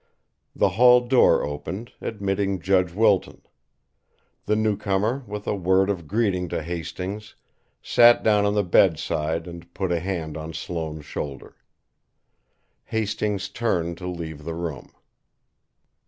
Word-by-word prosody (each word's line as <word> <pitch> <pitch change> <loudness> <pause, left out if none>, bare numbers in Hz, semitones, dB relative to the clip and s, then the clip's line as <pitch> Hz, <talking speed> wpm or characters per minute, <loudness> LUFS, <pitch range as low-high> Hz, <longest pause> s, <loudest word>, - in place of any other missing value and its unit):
The - - +3
hall 125 +2 +6
door 125 +1 +4
opened, 95 +10 -5
admitting 100 -2 -2
Judge 90 0 +2
Wilton. 105 0 +1 1.0
The 105 - +2
newcomer, 105 +3 0
with 105 0 -6
a - - 0
word 95 +1 +2
of 85 -5 -5
greeting 95 -4 0
to 80 - -3
Hastings, 90 +5 -6 0.5
sat 120 0 +5
down 105 -2 +4
on 100 0 +1
the 105 - +2
bedside 80 -2 +1
and 85 -1 -10
put 95 -2 -2
a 85 - +1
hand 80 -4 -4
on 80 +1 -7
Sloane's 80 -2 -5
shoulder. 70 -1 -6 1.3
Hastings 105 -2 -2
turned 85 -7 -2
to 90 - -6
leave 80 -4 -6
the 80 +1 -5
room. 85 -4 -6
95 Hz, 125 wpm, -24 LUFS, 85-105 Hz, 1.3 s, hall